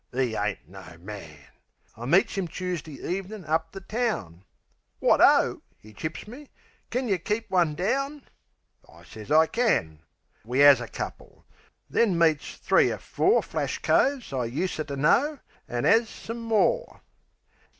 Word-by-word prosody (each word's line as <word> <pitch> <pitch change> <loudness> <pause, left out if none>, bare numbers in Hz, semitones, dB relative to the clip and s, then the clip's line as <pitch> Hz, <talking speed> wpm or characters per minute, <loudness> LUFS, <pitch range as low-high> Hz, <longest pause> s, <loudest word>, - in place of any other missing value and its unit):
'E 125 -4 0
ain't 105 -2 -3
no 90 -2 -12
man!) 90 -5 -9 0.6
I 115 - -8
meets 190 - +3
'im 195 -3 -2
Choosdee 170 -5 -5 0.2
ev'nin' 195 -1 -9
up 160 +1 -1
the 195 - -9
town. 195 - -3 0.6
"Wot - - +3
O," - - +4 0.2
'e 110 0 -14
chips 155 - -6
me. 265 +6 -11 0.4
"Kin 255 0 -2
yeh 195 -4 +1
keep 210 +3 -3
one 170 -5 +2
down?" 275 - -2 0.7
I - - -17
sez 110 +2 -11
I 160 +1 +6
can. 160 - 0 0.4
We 125 +6 +2
'as 145 -3 +8
a 120 - -5
couple; - - -8 0.4
then 205 -7 +2
meets 160 -3 +1
three - - +3
er - - -3
four 410 +5 +1
Flash - - -3
coves 265 - +1
I 125 -2 -1
useter 150 +3 -3
know, 250 - +2 0.3
an' 120 0 -2
'as 225 +1 +4
some 230 +1 -7
more. 230 - 0
170 Hz, 150 wpm, -26 LUFS, -, 0.7 s, as